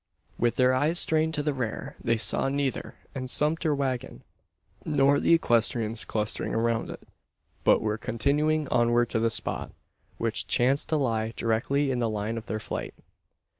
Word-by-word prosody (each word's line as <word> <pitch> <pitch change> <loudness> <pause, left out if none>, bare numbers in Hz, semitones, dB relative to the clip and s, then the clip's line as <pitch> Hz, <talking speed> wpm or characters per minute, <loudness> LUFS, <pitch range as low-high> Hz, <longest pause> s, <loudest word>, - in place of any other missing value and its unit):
With 120 0 +1
their 130 0 +3
eyes 150 +6 +1
strained 160 -1 +2
to 150 - -1
the 150 0 0
rear, 125 -5 -4
they 115 0 +1
saw 125 +4 +2
neither 140 -1 -2 0.2
the 130 -2 -5
sumpter 150 +3 +1
waggon, 130 -3 -3 0.6
nor 140 -1 +3
the 170 - +4
equestrians 115 -5 +1
clustering 105 -1 -2
around 115 0 0
it, - - -10 0.6
but - - +4
were 105 0 -2
continuing 150 +7 0
onward 120 0 +2
to 115 - +1
the 115 +1 +2
spot; 110 - -3 0.4
which 115 -1 -1
chanced 130 +4 +2
to 160 - +1
lie 115 -5 -1
directly 135 +5 0
in 125 - -1
the 115 -2 0
line 110 +2 -3
of 110 - -16
their 110 - -3
flight. 60 - -5
125 Hz, 165 wpm, -27 LUFS, 115-145 Hz, 0.6 s, the